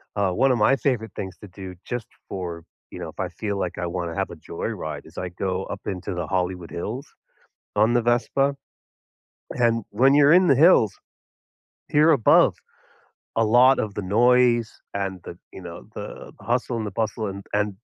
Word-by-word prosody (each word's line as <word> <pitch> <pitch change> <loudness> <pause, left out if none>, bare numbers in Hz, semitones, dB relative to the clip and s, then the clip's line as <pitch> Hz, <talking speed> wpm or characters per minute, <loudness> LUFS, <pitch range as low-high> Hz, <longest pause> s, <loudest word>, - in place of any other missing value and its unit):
Uh, 100 -2 +1
one 130 +8 +3
of 125 - +2
my 125 +5 +4
favorite 120 -6 -1
things 95 -2 -6
to 105 - -12
do 95 0 -9
just 120 -3 -4 0.2
for, 85 -3 -5 0.3
you - - -8
know - - -5
if - - -15
I - - -1
feel 100 -2 -4
like 90 - -3
I 90 - -2
wanna 85 -2 -4
have - - -1
a - - -8
joy - - -5
ride, 75 -2 -5
is 80 - -17
I 90 - -3
go 95 +1 -3
up 100 - -7
into 95 0 -4
the 85 -2 -4
Hollywood 90 -2 -2
Hills 115 - -5 0.7
on 110 +3 +4
the 120 - +3
Vespa, 135 +4 +1 1.0
and 115 -3 +1
when 130 +6 +4
you're 145 +1 +6
in 180 0 +6
the 135 - +6
hills, 135 - +5 1.0
here 155 +2 +4
above, 125 -7 +5 0.8
a 115 - +3
lot 125 +4 +5
of 105 -2 -2
the 105 - -2
noise, 120 +2 +3 0.2
and 95 -2 -3
the, 85 - -9
you 95 - -10
know, 85 -1 -10
the - - -8
hustle 120 0 -1
and 110 - -3
the - - -5
bustle, 110 +1 -2
and 100 0 -7
and 105 -1 0
105 Hz, 190 wpm, -24 LUFS, 95-120 Hz, 1.0 s, you're